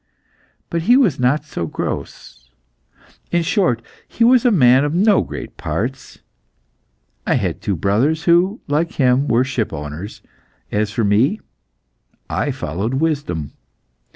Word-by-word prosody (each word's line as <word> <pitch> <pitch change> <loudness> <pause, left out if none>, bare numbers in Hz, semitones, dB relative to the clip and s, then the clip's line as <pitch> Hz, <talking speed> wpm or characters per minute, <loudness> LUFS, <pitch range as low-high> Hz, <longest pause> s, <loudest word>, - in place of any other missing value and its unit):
But 170 - -1
he 245 - +7
was 210 - +2
not 140 +5 +1
so 85 - -4
gross. - - -6 0.8
In 175 -1 +1
short, 165 - +1 0.2
he 235 - -1
was 245 0 +5
a - - +6
man 130 - +5
of 145 +2 -1
no 200 +2 +4
great - - -8
parts. 130 +5 -5 1.0
I - - +3
had - - -2
two 100 - -1
brothers, 115 - +1
who, 180 +5 +2
like 155 +3 0
him, 130 +1 +2
were 120 +2 +3
shipowners. 100 - -5 0.5
As 105 0 0
for 110 +2 -2
me, 115 - +2 0.9
I 140 - -1
followed 110 - -3
wisdom. 135 - -2
135 Hz, 130 wpm, -19 LUFS, 105-170 Hz, 1.0 s, he